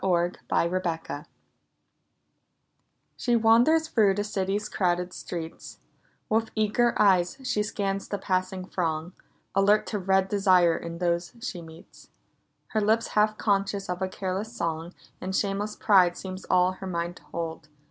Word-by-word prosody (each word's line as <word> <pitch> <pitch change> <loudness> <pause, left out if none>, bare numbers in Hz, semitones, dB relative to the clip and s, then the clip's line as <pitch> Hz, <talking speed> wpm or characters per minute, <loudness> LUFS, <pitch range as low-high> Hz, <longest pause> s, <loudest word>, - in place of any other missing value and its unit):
II 175 -2 +2 0.2
EVE'S 180 +2 +1
DAUGHTERS 165 -4 -4 1.9
SHE 240 -1 +1
wanders 235 +9 +4
through 210 -8 +3
the 205 - -1
city's 205 0 -2
crowded 180 -2 0
streets; 165 -2 -7 0.5
With 225 +1 +1
eager 220 +2 +2
eye 195 -4 +6
she 255 +4 -3
scans 195 -2 -2
the 205 - -3
passing 185 -1 -2
throng, 165 -1 -2 0.4
Alert 205 +2 +4
to 210 - -3
read 190 0 +2
desire 185 -4 +4
in 170 0 -6
those 170 0 -1
she 190 -8 -5
meets; 165 +1 -15 0.6
Her 220 - 0
lips 220 +2 +2
half 215 0 +2
conscious 195 -1 0
of 180 +1 -3
a 190 - +1
careless 190 +3 -3
song, 170 -5 -4 0.3
And 190 +1 -3
shameless 205 +1 -1
pride 185 -4 +4
seems 190 0 -7
all 180 0 +3
her 190 +1 -8
mind 175 -1 -3
to - - -17
hold. 165 -1 -6
190 Hz, 145 wpm, -27 LUFS, 175-210 Hz, 1.9 s, eye